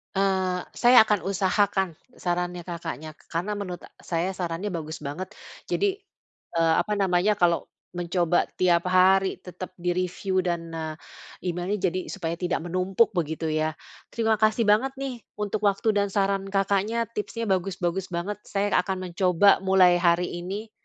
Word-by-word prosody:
Eee, 190 -2 +1
saya 245 -1 +7
akan 210 -4 0
usahakan 195 -1 +1 0.2
sarannya 175 0 -2
Kakaknya, 165 -3 -6 0.2
karena 175 +5 -2
menurut 180 -3 -6
e - - -12
saya 175 +2 -1
sarannya 180 +2 -3
bagus 155 -2 -5
banget. 150 +6 -4 0.4
Jadi, 400 0 0 0.6
eee, 165 -1 +3
apa 210 - -2
namanya, 195 +1 +2
kalau 175 -3 +2 0.3
mencoba 175 0 +1
setiap 175 -2 +2
hari 190 +1 +4
tetap 185 +1 -8
di-review 180 +2 -1
dan, 170 -2 -2
eee, 160 -1 -4 0.6
email-nya 180 +4 -2
jadi 185 - -2
supaya 170 -4 -3
tidak 180 -2 -1
menumpuk 185 +5 +1
begitu, 160 -3 -2
ya. 155 0 0 0.4
Terima 225 -1 +2
kasih 220 +1 +3
banget, 225 +6 +3
nih, 265 -3 -5 0.2
untuk 210 0 -1
waktu 200 +3 +2
dan 205 -1 +1
saran 195 0 0
Kakaknya, 200 +4 0
tipsnya 230 +1 -4
bagus-bagus 190 -1 -1
banget. 185 +5 -3
Saya 200 0 -1
akan 185 -1 -3
mencoba, 185 +2 +4
mulai 185 -2 +5
hari 175 0 +3
ini, 200 +5 -6
185 Hz, 145 wpm, -26 LUFS, 175-200 Hz, 0.6 s, saya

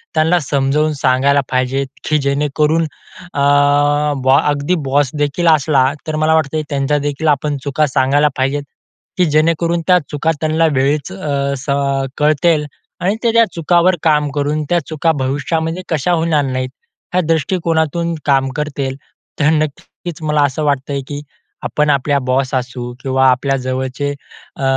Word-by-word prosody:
त्यांना 160 +3 +3
समजवून 145 +1 0
सांगायला 135 +1 +2
पाहिजेत, 130 +1 0 0.2
की 155 - +3
जेणेकरून 150 +3 +1 0.5
अ, - - -3 0.8
बॉ 130 +1 +5
अगदी 145 +5 0
बॉस 135 0 +1
देखील 145 +4 0
असला, 145 -3 +4 0.2
तर 155 - -2
मला 155 +1 +2
वाटतं 155 0 0
त्यांच्या 140 +1 0
देखील 145 +2 -2
आपण 145 0 0
चुका 145 +2 +1
सांगायला 140 +3 +2
पाहिजेत, 135 +2 0 0.5
की 180 - +4
जेणेकरून 165 +2 +2
त्या 180 -1 +5
चुका 155 +2 0
त्यांना 160 +1 +2
वेळीच 140 +5 0
अ, 140 -6 -2
स 130 +2 -9
अ, 140 -1 0
कळतील 150 +1 +2 0.4
आणि 195 +4 +1
ते 230 - +3
त्या 230 0 +5
चुकावर 175 +2 +3
काम 150 -2 +2
करून, 145 +2 -1
त्या 175 - +3
चुका 160 +1 +1
भविष्यामध्ये 160 +6 -2
कशा 160 +2 0
होणार 160 -3 +1
नाहीत 130 -1 -2 0.5
या 185 - +4
दृष्टीकोनातून 165 0 0
काम 135 -2 +2
करतील. 140 -3 -3 0.4
तर 150 0 +3
नक्कीच 155 +2 -4
मला 150 -1 +1
असं 145 +2 -1
वाटतंय, 140 -1 -1
की 145 0 -5 0.4
आपण 150 0 0
आपल्या 140 0 +2
बॉस 130 +1 0
असू 125 -1 -4
किंवा 130 0 +2
आपल्या 135 +2 +1
जवळचे 130 +2 -3 0.5
अ, - - -5
145 Hz, 150 wpm, -16 LUFS, 135-160 Hz, 0.8 s, बॉ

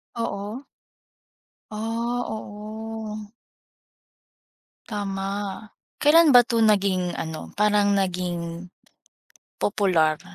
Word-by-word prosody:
Oo. 230 +1 -4 1.1
Ah, 230 +3 -2
oo. 215 0 -7 1.6
Tama, 200 0 -4 0.3
kailan 305 -1 +6
ba 245 - +10
to 235 -1 -2
naging 195 -4 +2
ano, 160 -1 -6
parang 210 -1 +3
naging 175 -3 -2 0.9
popular, 175 -7 +2
205 Hz, 70 wpm, -24 LUFS, 195-225 Hz, 1.6 s, ba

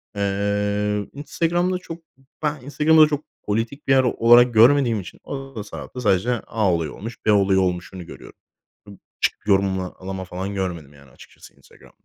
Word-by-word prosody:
Eee, 100 +1 -1
Instagram'da 170 +5 -1
çok, 170 -2 -9 0.2
b 135 - -26 0.2
ben 150 -3 -1
Instagram'ı 150 +4 +3
da 155 - +8
çok 150 0 -3 0.2
politik 115 +8 -3
bir - - +2
yer 130 -1 +5
olarak 120 0 +5
görmediğim 120 0 +5
için 90 - -12
onu 135 -1 -7
da 105 - -5 0.4
sadece 105 +1 +2 0.2
"A 105 -5 +1
olayı 80 -3 -2
olmuş, 115 +4 -9
B 110 - +4
olayı 100 -2 +3
olmuş"unu 90 0 -3
görüyorum. - - -13 0.5
Ib 100 -2 -12 0.2
çık - - +1
yorumla, 95 -2 +1
alama 95 0 -6
falan 95 +2 -5
görmedim, 85 -7 -4
yani, 70 -2 -18
açıkçası - - -17
Instagram'da. - - -21
105 Hz, 165 wpm, -22 LUFS, 95-135 Hz, 0.5 s, da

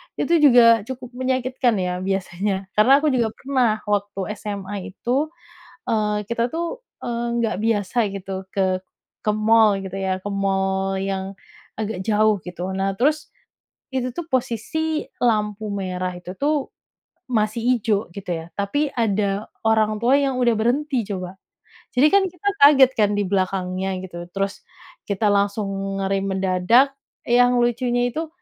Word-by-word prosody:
itu - - -2
juga 240 -5 +7
cukup 255 -1 -7
menyakitkan 255 -1 0
ya 180 -2 -2
biasanya. 190 +1 -2
Karena 215 +5 +4
aku 305 - +3
juga 240 -3 +2
pernah 245 -6 0
waktu 205 -1 -1 0.2
SMA 205 -1 -5 0.2
itu, 265 +6 0 0.6
eee, 210 -1 0
kita 235 +3 -1
tuh, 340 - -4 0.2
eee, 235 0 -2
nggak 235 -2 0
biasa 220 0 -1 0.2
gitu 190 0 -6
ke 190 -1 0 0.4
ke 210 - 0
mall 215 -1 +4
gitu 190 0 -5
ya, 190 -1 -2
ke 205 - -4
mall 195 -1 0
yang 195 0 -3 0.4
agak 215 -3 -3
jauh 215 -1 +3
gitu. 180 +1 -5
Nah, 195 0 -1
terus 300 +6 +1 0.6
itu 260 -1 -1
tuh 345 - -3
posisi 305 +6 -1 0.2
lampu 215 -3 0
merah 185 -3 -3
itu 180 0 -8
tuh 290 -1 0 0.6
masih 215 -2 0 0.2
ijo 210 -1 +1
gitu 195 -2 -7
ya, 165 -1 -3
tapi 205 +10 0
ada 205 -3 0 0.2
orang 215 -1 +2
tua 240 +4 +3
yang 275 -2 +2
udah 240 -2 +3
berhenti 250 +4 0
coba. 185 -1 -4 0.6
Jadi 270 - +6
kan 400 -1 +6
kita 360 +3 -4
kaget 275 -2 +8
kan 210 -1 +4
dibelakangnya 190 -1 -1 0.2
gitu, 175 -1 -8
terus 195 0 -2 0.5
kita 205 +1 +1
langsung 200 +1 +1 0.3
ngerem 195 0 0
mendadak, 190 +8 +3 0.3
yang 245 +1 +4
lucunya 245 0 +1
itu 320 +1 -3
215 Hz, 140 wpm, -22 LUFS, 195-245 Hz, 0.6 s, kaget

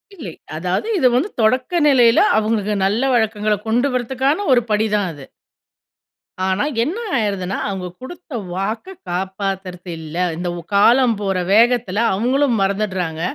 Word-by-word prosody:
இல்லை. 245 - -7 0.3
அதாவது 180 - -2
இது 265 - +4
வந்து 310 +12 +1
தொடக்க 255 +10 +1
நிலையில, 245 -5 +5 0.2
அவுங்களுக்கு 215 -1 0
நல்ல 225 +8 +1
வழக்கங்கள 215 -2 +1
கொண்டு 240 +5 +2
வரதுக்கான 265 - 0
ஒரு 245 - +4
படிதான் 210 -2 +1
அது. 145 -3 -11 1.2
ஆனா 190 +2 0 0.2
என்ன 320 - -3 0.2
ஆய்றதுன்னா, 200 -4 -2
அவுங்க 190 -3 -4
குடுத்த 335 +3 -10 0.2
வாக்க 220 - -4
காப்பாத்துறது 190 0 -4
இல்ல. 160 +1 -8 0.2
இந்த 175 +1 -3
ஓ - - -8
காலம் 235 +3 +5
போற 195 -2 -1 0.2
வேகத்துல 230 -2 +3
அவங்களும் 245 +3 +1
மறந்துட்றாங்க, 190 -5 -1
215 Hz, 130 wpm, -19 LUFS, 190-250 Hz, 1.2 s, நிலையில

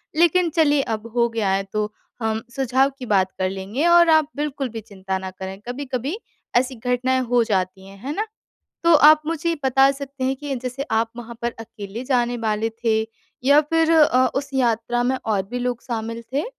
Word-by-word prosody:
लेकिन 345 +1 +3
चलिए 295 -3 +4
अब 215 +2 -10
हो 235 0 +3
गया 220 -4 -1
है 195 0 +1
तो, 210 0 -1 0.3
हम 220 0 -1
सुझाव 265 +1 +2
की 250 - -6
बात 190 -3 +2
कर 185 0 +1
लेंगे 195 - -3
और 345 -1 +6
आप 315 -2 +5
बिल्कुल 280 -3 -3
भी 225 - -5
चिंता 190 -3 -5
ना 190 0 -6
करें 190 +1 -8
कभी-कभी, 265 - -3 0.4
ऐसी 255 +1 +2
घटनाएँ 250 +2 0
हो 245 -1 +4
जाती 190 -2 -2
हैं, 195 - -13
है 285 +3 -3
ना? 425 +2 -1 0.6
तो 335 -1 +6
आप 305 +1 +7
मुझे 330 +1 -1
बता 270 +1 +5
सकते 275 -1 -6
हैं 265 +1 0
कि 285 0 -4
जैसे 255 +2 -4 0.2
आप 225 0 0
वहाँ 235 0 -8
पर 235 0 -1
अकेले 220 +1 -8
जाने 245 -2 +1
वाले 215 +1 0 0.2
थे 220 -1 +3 0.4
या 285 +2 +6
फिर 325 +2 +1
अ, 275 -5 +5
उस 275 0 -2
यात्रा 240 -1 +1
में 260 +2 +1
और 210 -3 +1
भी 245 - -3
लोग 245 -1 -2
शामिल 230 -1 -4
थे? 285 +4 0
245 Hz, 195 wpm, -22 LUFS, 220-280 Hz, 0.6 s, आप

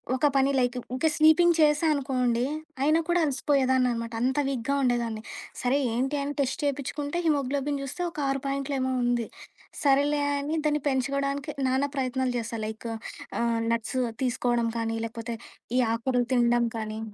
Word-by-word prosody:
ఒక 290 +3 +3
పని 270 +1 +4
లైక్ 250 0 +1 0.2
ఇంకా 320 +5 +1
స్వీపింగ్ 320 +2 +6
చేశానుకోండి, 275 -6 +2 0.4
అయినా 310 +3 +4
కూడా 350 0 +3
అలసిపోయేదాన్నినమాట. 255 -4 +1
అంత 260 +3 +1
వీక్‌గా 265 +1 -1
ఉండేదాన్ని. 235 -3 0 0.4
సరే 255 +3 +2 0.2
ఏంటి 265 +4 0
అని 285 +1 -2
టెస్ట్ 265 0 0
చేపిచ్చుకుంటే, 285 +2 -2
హిమోగ్లోబిన్ 280 -1 0
జూస్తే 275 +6 -5
ఒక 300 - -8
6 270 -1 -1
పాయింటులు 275 0 -2
ఏమో 260 0 0
ఉంది. 240 -2 +1 0.6
సరేలే, 285 +1 +3 0.2
అని 295 +3 -2
దాన్ని 300 -1 +1
పెంచుగోవడానికి, 275 +2 -1 0.2
నానా 270 +2 +1
ప్రయత్నాలు 260 -1 0
జేసా. 230 -1 -4
లైక్ 220 +2 -6 0.5
ఆహ్, 230 -1 +1
నట్స్ 230 +2 -1 0.3
తీసుకోవడం 240 -2 +1
కానీ, 225 0 -1
లేకపోతే, 230 +1 -5 0.4
ఈ - - +5
ఆకూరలు 245 +1 0
తినడం 240 -1 +3
కానీ 215 0 -4
260 Hz, 145 wpm, -27 LUFS, 240-285 Hz, 0.6 s, స్వీపింగ్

